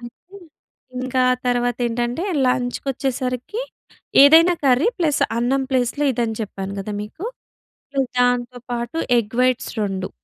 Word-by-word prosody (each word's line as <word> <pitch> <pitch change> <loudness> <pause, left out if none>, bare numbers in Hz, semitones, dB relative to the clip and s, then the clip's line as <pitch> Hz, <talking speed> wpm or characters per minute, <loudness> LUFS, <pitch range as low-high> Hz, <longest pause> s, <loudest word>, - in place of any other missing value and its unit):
అయితే 250 +11 -13 0.6
ఇంక 255 0 -5 0.2
ఆ - - +5
తరవాతేంటంటే, 245 +2 -1 0.2
లంచ్‌కొచ్చేసరికి 255 - -2 0.6
ఏదైనా 325 +5 +7
కర్రీ 265 - +4
ప్లస్ 310 -5 +1 0.2
అన్నం 265 +3 +1
ప్లేస్‌లొ 255 +2 0
ఇదని 225 -2 -2
చెప్పాను 195 -2 -5
కదా 210 +2 -5
మీకు. 215 - -9 0.7
ప్లస్ 270 -2 -1
దాంతో 245 0 +1
పాటు 240 +5 -3 0.2
ఎగ్ 220 -1 -3
వైట్స్ 255 -1 +1
2. 195 -2 -2
245 Hz, 115 wpm, -21 LUFS, 240-270 Hz, 0.7 s, ఏదైనా